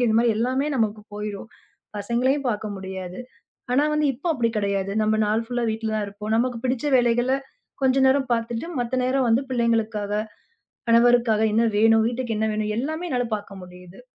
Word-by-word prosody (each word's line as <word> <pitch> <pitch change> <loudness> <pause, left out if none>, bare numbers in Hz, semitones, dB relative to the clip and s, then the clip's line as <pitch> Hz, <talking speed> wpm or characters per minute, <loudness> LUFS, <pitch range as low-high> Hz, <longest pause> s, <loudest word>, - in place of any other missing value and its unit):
துவைக்க 245 - +3
இந்த 220 - +2
மாதிரி 235 -2 +2
எல்லாமே 260 +5 0
நமக்குப் 215 -2 -2
போயிடும். 210 0 -5 0.5
பசங்களையும் 250 +6 0
பார்க்க 215 -1 -2
முடியாது. 190 -1 -7 0.5
ஆனா 285 +4 +3
வந்து 300 -1 +2
இப்ப 270 +8 -22
அப்படி 235 -3 +1
கிடையாது. 200 -1 -1
நம்ம 215 0 +2
நாள் 215 +2 +1
ஃபுல்லா 245 0 -2
வீட்ல 220 0 -3
தான் 210 - -1
இருப்போம். 210 +2 -5
நமக்குப் 240 0 -1
பிடிச்ச 255 +2 -1
வேலைகள்ல 245 +2 +2 0.5
கொஞ்ச 260 0 +3
நேரம் 265 -1 +2
பார்த்துட்டு 230 +4 -2
மத்த 245 +1 -2
நேரம் 260 0 +1
வந்து 230 +3 +4
பிள்ளைங்களுக்காக, 225 -4 0 0.8
கணவருக்காக 235 -1 +4
என்ன 230 +2 +3
வேணும், 225 +1 +5
வீட்டுக்கு 240 -2 -3
என்ன 220 - +1
வேணும் 215 0 -1
எல்லாமே 315 +6 -3
என்னால 245 -1 0
பார்க்க 195 -2 -10
முடியுது. 180 +2 -13
230 Hz, 170 wpm, -24 LUFS, 210-250 Hz, 0.8 s, வேணும்